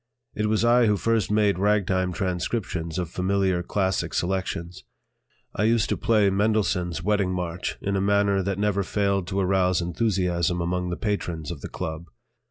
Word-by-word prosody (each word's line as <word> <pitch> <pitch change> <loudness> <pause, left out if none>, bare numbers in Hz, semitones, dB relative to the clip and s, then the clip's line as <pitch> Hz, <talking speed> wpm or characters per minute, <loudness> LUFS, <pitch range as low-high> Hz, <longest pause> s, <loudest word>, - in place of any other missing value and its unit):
It 105 0 -1
was 110 +1 +2
I 120 0 +5
who 105 -1 +3
first 115 -1 +1
made 105 -3 +2
ragtime 95 -2 +1
transcriptions 90 -2 -3
of 90 -2 -1
familiar 95 -1 +1
classic 95 +1 -1
selections. 90 -1 -2 0.7
I 105 - +1
used 115 0 +2
to - - +1
play 105 -3 +2
Mendelssohn's 95 -5 0
"Wedding 100 -1 +1
March" 90 -1 -3
in 100 0 -1
a 95 - +1
manner 100 0 +2
that 95 0 -2
never 100 -1 +1
failed 100 -1 0
to 95 0 -2
arouse 95 -1 +2
enthusiasm 90 -2 0
among 90 +1 -1
the 85 - -3
patrons 85 -7 -3
of 75 -5 -7
the - - -6
"Club." 80 +1 -5
95 Hz, 165 wpm, -25 LUFS, 90-105 Hz, 0.7 s, I